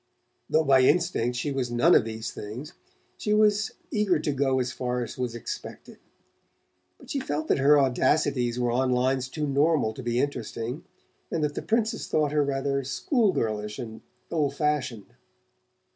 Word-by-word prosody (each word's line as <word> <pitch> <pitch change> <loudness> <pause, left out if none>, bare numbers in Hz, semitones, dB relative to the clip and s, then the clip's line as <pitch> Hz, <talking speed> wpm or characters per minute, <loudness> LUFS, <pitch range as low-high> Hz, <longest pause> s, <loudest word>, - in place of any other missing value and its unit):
Though 160 - +3
by 135 -3 +5
instinct 125 -4 +2
she 145 +3 -2
was 130 -3 -2
none 120 +9 +4
of - - +5
these 110 +1 -5
things, 125 - -8 0.5
she 210 0 +1
was 210 0 +3 0.2
eager 210 -5 +2
to 150 0 -1
go 135 -1 +1
as 125 -1 -1
far 125 -1 -2
as 115 - -7
was 125 -2 -3
expected; 120 - -8 1.0
but - - -12
she 280 - -1
felt 155 - -3
that - - +3
her 145 +2 +6
audacities 130 -2 +1
were 120 -1 +1
on 130 +2 +1
lines 130 +1 +1
too 150 +2 -3
normal 140 -4 +2
to 120 - -8
be 120 0 -1
interesting, 125 -1 -3 0.4
and 160 - -1
that 150 -1 0
the - - -4
Princess 225 0 0
thought 150 -2 +1
her 150 0 +2
rather 140 0 -1
school 210 - +1
girlish 105 -6 -2
and 110 -2 -7 0.3
old 150 -4 0
fashioned. 135 - -2
135 Hz, 170 wpm, -26 LUFS, 120-150 Hz, 1.0 s, her